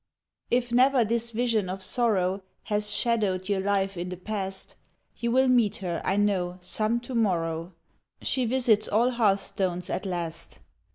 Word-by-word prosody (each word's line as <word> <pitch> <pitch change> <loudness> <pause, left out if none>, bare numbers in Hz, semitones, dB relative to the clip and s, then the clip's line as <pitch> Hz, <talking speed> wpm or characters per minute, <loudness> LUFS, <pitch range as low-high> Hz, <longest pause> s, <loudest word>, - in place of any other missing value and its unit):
If 245 0 +1
never 255 0 +4
this 235 +1 -1
vision 230 -4 0
of 190 +1 -4
sorrow 195 -4 +1 0.2
Has 210 0 0
shadowed 205 -4 +1
your 200 -2 +1
life 195 0 0
in 175 +1 -4
the 180 - -6
past, 195 0 -5 0.4
You 235 - -1
will 260 +2 +4
meet 240 -5 +3
her, 175 -4 -3
I 195 - 0
know, 185 -3 +1
some 215 +5 -1
to 250 +2 -8
morrow 170 -6 0 0.5
She 255 -2 0
visits 230 -3 +2
all 235 +4 +2
hearthstones 195 -5 0
at 195 - -2
last. 170 -2 -4
205 Hz, 155 wpm, -27 LUFS, 185-235 Hz, 0.5 s, never